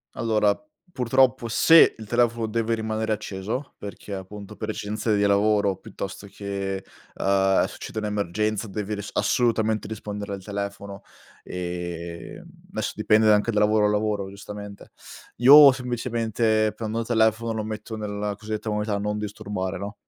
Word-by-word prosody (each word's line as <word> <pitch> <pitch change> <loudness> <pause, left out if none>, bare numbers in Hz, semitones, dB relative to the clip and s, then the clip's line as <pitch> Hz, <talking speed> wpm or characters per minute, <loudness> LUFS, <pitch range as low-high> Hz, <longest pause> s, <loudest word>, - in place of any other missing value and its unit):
Allora 105 -3 +2 0.4
purtroppo 125 -2 +2
se 160 +8 +6
il 110 - -9
telefono 120 +1 +1
deve 115 +1 0
rimanere 110 0 -1
acceso, 105 +7 -5
perché 100 0 -8
appunto 100 +1 -8
per - - -4
esigenze 105 +1 -1
di 100 - +1
lavoro 100 -1 +2
piuttosto 100 -1 -7
che, 100 -1 -4 0.3
ehm, 95 0 +2
succede 110 - -6
un'emergenza 105 +1 -1
devi 105 +1 -4
ris 105 0 -6
assolutamente 110 -3 +1
rispondere 105 -1 -5
al 95 -1 -7
telefono 100 0 -5 0.4
e 85 -1 -6
adesso - - -6
dipende 110 0 +4
anche 105 +2 +3
da 105 - +1
lavoro 105 0 +3
a - - +3
lavoro 105 -1 0
giustamente. 100 +1 -10 0.5
Io 140 +3 +9
semplicemente 115 -3 0
prendo 110 0 -3
il 115 - -2
telefono 115 0 +2
lo 110 -1 -3
metto 110 +1 -6
nella 105 -1 -3
cosiddetta 110 +1 -5
modalità 105 0 -1
non 105 +1 -2
disturbare, 100 -2 -4
no? 100 +2 -6
105 Hz, 140 wpm, -24 LUFS, 100-110 Hz, 0.5 s, Io